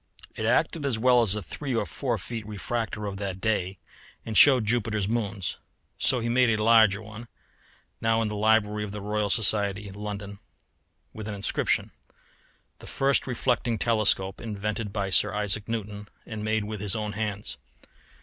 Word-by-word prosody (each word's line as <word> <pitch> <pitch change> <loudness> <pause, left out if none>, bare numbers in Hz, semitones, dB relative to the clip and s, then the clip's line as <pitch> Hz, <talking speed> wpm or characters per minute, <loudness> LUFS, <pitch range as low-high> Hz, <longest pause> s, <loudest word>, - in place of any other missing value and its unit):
It 110 - -2
acted 155 +6 +2
as 135 -5 0
well 125 +1 +5
as 105 -3 +2
a 105 - -4
three 135 - -4
or 115 - +1
four 125 -5 -2
feet 115 +3 -5
refractor 110 0 -3
of 100 -1 -4
that 95 -2 -4
day, 95 -2 -1 0.5
and 110 - -4
showed 130 -4 +7
Jupiter's 110 -2 +1
moons. 100 -5 -2 0.4
So 125 - +2
he 115 - -2
made 125 +1 +3
a 110 -1 +1
larger 110 -2 +5
one, 110 +2 -10 0.7
now 115 0 +2
in - - -1
the 105 - -4
library 105 0 +2
of 105 - -5
the 105 - -5
Royal 105 0 -1
Society, 100 -1 +1
London, 100 0 -6 0.7
with 110 -1 -7
an 105 - -4
inscription: 100 - 0 0.9
"The - - -11
first 135 0 +1
reflecting 120 -2 0
telescope, 105 -4 +1
invented 105 -1 -3
by 100 -2 -2
Sir 100 +1 +2
Isaac 105 +1 -1
Newton, 105 -2 -4 0.2
and 110 -2 -6
made 110 0 0
with 105 -1 -5
his 100 -3 -1
own 105 -1 -2
hands." 105 -1 -4
105 Hz, 170 wpm, -27 LUFS, 100-115 Hz, 0.9 s, showed